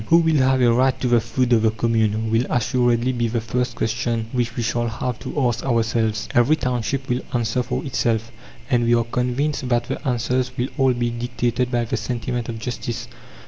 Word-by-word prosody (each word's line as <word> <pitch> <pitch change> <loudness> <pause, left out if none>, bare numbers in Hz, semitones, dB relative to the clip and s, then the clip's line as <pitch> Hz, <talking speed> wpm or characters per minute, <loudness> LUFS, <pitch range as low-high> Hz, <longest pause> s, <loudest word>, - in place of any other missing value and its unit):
Who 165 - +6
will 160 -2 +3
have 130 -1 +3
a 120 -1 +5
right 130 +2 +2
to 125 - 0
the 120 -1 +4
food 125 +2 0
of 115 - +4
the 110 - +4
commune? 110 -1 0
will 115 +2 +2
assuredly 120 0 +1
be 120 -2 0
the 115 +1 -1
first 125 +3 -2
question 115 +1 -1
which 120 -1 -1
we 120 - -2
shall 120 +1 0
have 115 +1 -3
to - - -4
ask 120 - -2
ourselves. 110 -3 0
Every 120 +6 +4
township 125 -1 -2
will 125 0 0
answer 120 +1 +1
for - - -3
itself, 115 -4 -1 0.4
and 120 -4 +2
we 120 0 +4
are 115 - +2
convinced 125 +3 -1
that 120 -1 +2
the - - -5
answers 125 +1 -1
will 125 +2 -1
all 135 -1 +4
be 120 -1 -1
dictated 120 +1 -1
by 120 -2 0
the - - -2
sentiment 120 -1 -3
of 115 - -4
justice. 120 0 -4
120 Hz, 205 wpm, -22 LUFS, 115-125 Hz, 0.4 s, Who